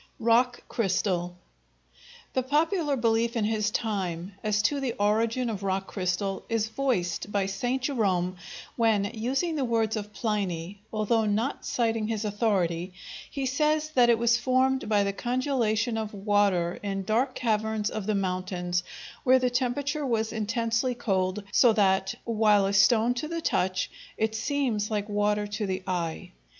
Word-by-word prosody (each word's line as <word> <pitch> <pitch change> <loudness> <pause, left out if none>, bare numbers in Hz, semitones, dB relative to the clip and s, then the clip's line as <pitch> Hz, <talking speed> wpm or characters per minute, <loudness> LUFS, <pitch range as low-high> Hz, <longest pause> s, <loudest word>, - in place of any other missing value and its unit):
Rock 240 +2 +2
crystal 185 -4 -1 1.0
The 260 - +2
popular 300 +3 +1
belief 230 0 +1
in 225 - +1
his 215 -1 +1
time 195 -5 -3
as 210 -1 +1
to 280 +5 +1
the 260 -4 -2
origin 225 +4 +1
of 215 -4 -3
rock 195 0 -1
crystal 190 +1 -2
is 225 -1 0
voiced 215 -7 -1
by 200 -2 +1
St. 245 +7 -2
Jerome, 190 -9 0 0.4
when, 220 -3 +2
using 270 +9 -1
the 280 - 0
words 225 -2 +1
of 210 -1 -5
Pliny, 200 -4 -3
although 220 +1 +1
not 215 +6 -1
citing 225 -2 0
his 220 -1 -2
authority, 190 -5 0 0.4
he 275 -1 -3
says 305 +3 +1
that 245 -5 +4
it 235 - +5
was 235 +1 +3
formed 260 -1 +1
by 205 -2 +3
the 200 0 -1
congelation 240 -2 0
of 215 -1 -5
water 200 -4 +1
in 195 -1 -3
dark 225 +7 0
caverns 220 -2 0
of 215 -2 -4
the 215 - +1
mountains, 180 -2 -1 0.4
where 260 0 +6
the 250 -1 +1
temperature 275 +4 -1
was 225 -4 0
intensely 230 +3 0
cold, 195 -3 -1
so 235 +1 +5
that, 190 -2 +2
"While 215 -3 +3
a 195 - 0
stone 220 +4 +4
to 250 +5 -4
the 335 +1 -3
touch, 185 - 0 0.3
it 220 0 0
seems 225 -3 -1
like 210 -2 -2
water 210 0 +1
to 205 0 -3
the 185 0 -3
eye." 180 0 -3
215 Hz, 155 wpm, -27 LUFS, 195-245 Hz, 1.0 s, where